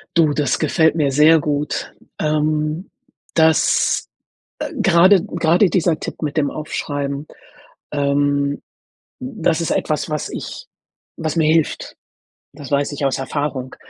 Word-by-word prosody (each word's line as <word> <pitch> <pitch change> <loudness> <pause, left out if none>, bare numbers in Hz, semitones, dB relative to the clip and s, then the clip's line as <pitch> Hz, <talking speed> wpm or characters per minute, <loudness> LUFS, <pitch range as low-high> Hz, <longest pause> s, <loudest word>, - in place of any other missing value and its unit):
Du, 160 -3 +4
das 145 -3 0
gefällt 160 -2 +2
mir 145 -4 +1
sehr 155 +4 +6
gut. 150 0 -2 0.3
Ähm, 155 +3 -1 0.5
das 160 -1 +3 0.5
äh, - - -4
gerade 185 +2 +4
gerade 175 0 +2
dieser 170 -3 +1
Tipp - - -7
mit 150 0 -3
dem 145 -2 +1
Aufschreiben, 145 -1 -4 0.7
ähm, 140 0 0 0.6
das 160 +5 -1
ist 165 - -2
etwas, 155 0 -1
was 150 -2 -3
ich - - -7 0.5
was 160 0 -3
mir 155 -1 +3
hilft. 160 -2 -1 0.6
Das 145 -2 -10
weiß 140 +1 +1
ich 140 0 -2
aus 135 0 0
Erfahrung. 135 -1 -3
150 Hz, 130 wpm, -19 LUFS, 145-160 Hz, 0.7 s, sehr